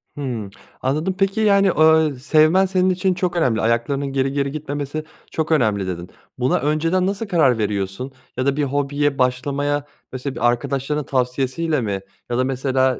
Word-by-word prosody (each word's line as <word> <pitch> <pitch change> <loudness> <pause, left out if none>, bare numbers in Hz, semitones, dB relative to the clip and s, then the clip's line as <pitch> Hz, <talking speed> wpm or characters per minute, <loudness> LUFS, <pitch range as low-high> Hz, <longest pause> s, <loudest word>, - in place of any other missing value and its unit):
Hımm. 120 -8 -4 0.3
Anladım. 155 +8 0
Peki, 195 +2 +1
yani, 200 -2 +4
eee, 155 -3 +4
sevmen 155 +7 +4
senin 185 0 +2
için 185 +1 +1
çok 180 -1 -2
önemli 125 -10 +2
ayaklarının 120 +5 0
geri 135 0 +1
geri 140 -1 0
gitmemesi 145 0 -4 0.3
çok 160 0 -2
önemli 105 -10 +2
dedi. 90 -1 -5 0.3
Buna 130 +1 +1
önceden 165 +6 +1
nasıl 200 +3 -2
karar 155 - +3
veriyorsun 105 +4 -2 0.3
ya 130 - 0
da 140 0 +2
bir 150 - +1
hobiye 145 +1 0
başlamaya 140 +3 0 0.3
mesela 130 +1 -5
bir 120 - +2
arkadaşlarının 140 +4 -1
tavsiyesiyle 135 +4 0
mi 100 -4 -2 0.3
ya 120 - -1
da 130 - +2
mesela 130 0 +1
140 Hz, 160 wpm, -21 LUFS, 125-155 Hz, 0.3 s, yani